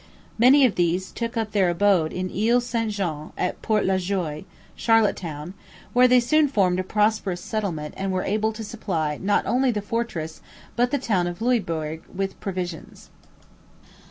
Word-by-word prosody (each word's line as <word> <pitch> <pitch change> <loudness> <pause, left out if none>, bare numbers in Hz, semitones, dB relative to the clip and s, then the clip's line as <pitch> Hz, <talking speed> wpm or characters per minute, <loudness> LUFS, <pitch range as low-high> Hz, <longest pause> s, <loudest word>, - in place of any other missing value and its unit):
Many 265 +4 +7
of 235 - +2
these 180 +1 0
took 230 0 -4
up 220 -2 -1
their 195 -3 +3
abode 175 -3 +2
in 185 0 -3
Ile 230 +5 +3
St 235 -2 -2
Jean 170 -7 -4
at 180 - -2
Port 215 -1 +1
La 190 0 +2
Joie 180 -4 -3 0.3
(Charlottetown), 185 -8 +1 0.4
where 250 +1 +6
they 250 0 +6
soon 305 +5 +3
formed 185 -8 +2
a - - 0
prosperous 210 -2 0
settlement 175 -8 -3
and 195 0 -2
were 185 0 -1
able 215 +2 0
to 220 +1 -7
supply 175 -9 -3
not 200 +1 +1
only 255 +2 +2
the 220 -4 0
fortress 205 -7 -4 0.3
but 245 +1 +2
the 285 - +1
town 195 -9 0
of 175 0 -5
Louisbourg 165 -10 -1
with 195 0 -4
provisions. 180 -4 -6
200 Hz, 165 wpm, -24 LUFS, 175-230 Hz, 0.4 s, Many